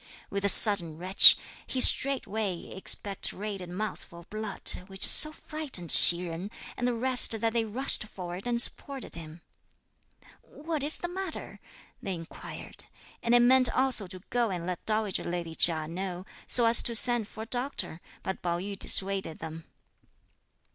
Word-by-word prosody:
With 200 0 -5
a 200 - +1
sudden 175 -7 +7
retch, 185 +3 +7 0.3
he 260 - -5
straightway 220 -9 +1
expectorated 195 0 -1
a - - -11
mouthful 180 -3 -8
of 170 - -23
blood, 215 -1 -5 0.2
which 190 -1 -3
so 305 - +6
frightened 300 - -6
Hsi 175 +1 +7
Jen 170 +4 -8 0.3
and 245 - -4
the 245 - -2
rest 245 -2 +2
that 225 +1 -3
they 230 -1 -2
rushed 230 +1 0
forward 180 +1 -9
and 240 -1 -1
supported 270 +2 0
him. 165 0 -6 1.0
"What 310 0 -8
is 295 +3 +2
the 350 - -6
matter?" 370 -1 -8 0.4
they 190 -2 -5
inquired, 165 -1 -11 0.4
and 235 +1 0
they - - +4
meant 255 +1 +3
also 255 -6 -2
to 185 0 -8
go 240 -2 -1
and 175 -3 -6
let 180 -1 -7
dowager 215 -3 -3
lady 170 -1 -6
Chia 160 -1 +2
know, 180 +2 -7 0.2
so 240 - +4
as 230 0 +6
to 235 - -2
send 240 -1 0
for 220 - -10
a - - -10
doctor, 245 - -3 0.2
but 190 - -7
Pao 170 -1 -3
yü 195 +2 -8
dissuaded 195 -4 -2
them. 160 0 -10
205 Hz, 160 wpm, -26 LUFS, 180-245 Hz, 1.0 s, sudden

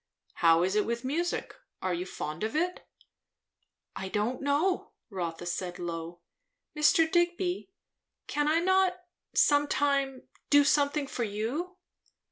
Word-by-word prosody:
How 165 0 +6
is 190 +2 0
it 210 - +2
with 235 +2 -2
music? 335 +6 -2 0.3
Are 185 -1 -1
you 175 +2 -3
fond 155 0 -5
of 220 +4 -2
it?" 355 +3 -1 1.1
"I 190 - -5
don't 215 +6 -1
know," 295 +7 0 0.2
Rotha 175 -3 -4
said 175 0 -3
low. 170 0 -5 0.5
"Mr. 300 +2 +5
Digby, 345 +3 0 0.6
can 295 0 0
I 320 +2 +3
not 375 0 +3 0.4
some 290 0 +4
time 275 -2 0 0.2
do 290 0 +7
something 285 0 +2
for 250 -3 -3
you?" 240 - -3
275 Hz, 130 wpm, -29 LUFS, -, 1.1 s, do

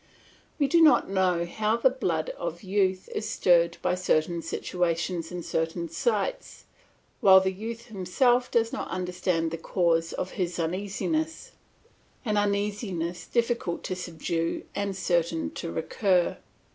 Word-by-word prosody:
We 285 - +2
do 335 +3 +4
not 285 -10 +5
know 180 -3 +2
how 215 +5 0
the 255 +2 +4
blood 170 -12 -1
of 170 +1 -6
youth 190 -1 0
is 215 - -3
stirred 170 -5 +3
by - - +2
certain 170 -2 +1
situations 175 0 -2
and 180 -2 -5
certain 165 +1 -2
sights, - - -2 0.5
while 190 -1 +8
the 190 0 0
youth 225 +4 -6
himself 240 +5 +1
does 230 -1 +1
not - - -3
understand 180 -2 -1
the 165 - -4
cause 165 -1 +1
of 185 - -4
his 175 -1 -1
uneasiness 205 - -2 0.7
an 215 -2 0
uneasiness 200 -4 -1
difficult 235 -7 -1
to 185 - -3
subdue 165 -1 -3
and 200 -1 -2
certain 170 -3 0
to 165 - -5
recur. 180 +2 +1
185 Hz, 135 wpm, -27 LUFS, 170-215 Hz, 0.7 s, while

